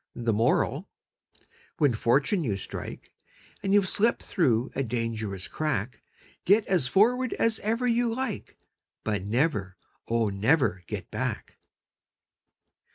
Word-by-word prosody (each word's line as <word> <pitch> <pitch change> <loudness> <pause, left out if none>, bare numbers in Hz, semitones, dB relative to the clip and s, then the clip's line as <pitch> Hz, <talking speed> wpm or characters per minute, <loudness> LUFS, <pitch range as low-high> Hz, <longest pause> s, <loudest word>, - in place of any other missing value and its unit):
The 115 -2 0
Moral: 115 +3 +1 0.9
When 145 -5 +3
fortune 140 - +2
you 105 -8 -1
strike, - - -7 0.5
And 195 - -1
you've 200 -1 +4
slipped 225 +5 +2
through 130 - +1
a 135 - -1
dangerous 110 -5 -3
crack, 130 -7 -2 0.4
Get 205 +3 +4
as 175 -9 +2
forward 245 - +3
as 230 -2 +1
ever 230 +4 -1
you 240 -1 +2
like, 245 -3 -4 0.5
But 105 -3 -2
never, 105 - 0 0.3
oh, 115 -2 +1
never 100 - +1
get - - -6
back! - - -4
135 Hz, 120 wpm, -27 LUFS, -, 0.9 s, you've